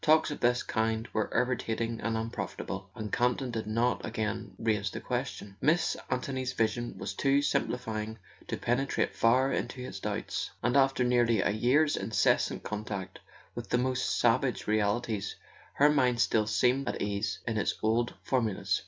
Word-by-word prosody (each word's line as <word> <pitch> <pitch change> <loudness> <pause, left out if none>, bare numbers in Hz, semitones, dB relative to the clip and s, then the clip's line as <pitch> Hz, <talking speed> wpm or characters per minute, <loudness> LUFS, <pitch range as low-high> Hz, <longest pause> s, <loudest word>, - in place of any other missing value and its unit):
Talks 155 0 +4
of 145 - -5
this 125 +1 +2
kind 110 0 -1
were 110 -1 0
irritating 115 -2 -1
and 115 0 -1
unprofitable, 115 +1 -4
and 110 -2 -6
Campton 125 +1 +1
did 110 -2 -3
not 115 +3 +1
again 110 -1 -3
raise 105 -3 0
the - - -6
question. 100 -1 -4
Miss 160 +3 +2
An¬ 125 0 0
thony's 130 -2 -3
vision 120 +1 -1
was 100 - -4
too 140 +6 +2
simplifying 110 -5 -1 0.3
to - - -2
penetrate 125 +4 0
far 130 +4 +3
into 130 - -3
his 125 -6 -6
doubts, 105 +1 -3
and 125 - +2
after 135 -2 +4
nearly 120 -3 +3
a - - +2
year's 130 +8 +3
incessant 100 0 +1
contact 105 -3 -5 0.3
with - - -7
the - - +3
most 125 0 0
savage 125 +1 +2
realities 105 0 0 0.4
her 145 +1 +5
mind 125 -5 +2
still 105 +1 +3
seemed 125 +5 +2
at - - -3
ease 100 0 -1
in 115 -2 -1
its - - 0
old 115 +2 +1
formulas. 105 -6 0
115 Hz, 160 wpm, -30 LUFS, 110-125 Hz, 0.4 s, her